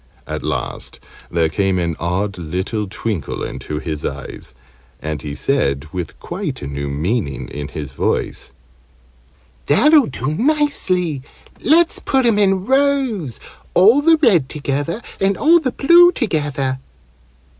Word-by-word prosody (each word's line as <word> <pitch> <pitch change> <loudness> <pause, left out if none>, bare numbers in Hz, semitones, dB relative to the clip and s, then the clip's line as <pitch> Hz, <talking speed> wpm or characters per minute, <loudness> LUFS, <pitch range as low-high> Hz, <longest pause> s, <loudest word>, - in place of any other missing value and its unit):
At - - -5
last - - -4 0.3
there 85 -1 +1
came 95 +4 0
an 85 -2 -1
odd 95 +3 -2
little 95 +6 -3
twinkle 105 - -4
into 75 - -5
his 75 -1 -4
eyes, 65 - -7 0.4
and 75 -2 -4
he 70 0 -6
said, 70 - 0
with 90 -3 -5
quite - - -5
a - - -4
new 70 0 -4
meaning 75 - -2
in 70 0 -6
his 75 -3 -7
voice, - - -2 1.2
"That'll 300 -2 +5
do 135 +2 -3
nicely. 190 - +1 0.4
Let's 335 +3 +3
put 265 -2 +1
'em 225 -3 +3
in 195 -2 +2
rows 265 - +1 0.4
all 220 +10 +6
the 325 +2 +5
red 190 - +3
together, 145 - -3 0.2
and 195 0 +1
all 335 +3 +5
the 265 -6 -2
blue 345 +7 +6
together." 145 - -1
140 Hz, 135 wpm, -19 LUFS, -, 1.2 s, all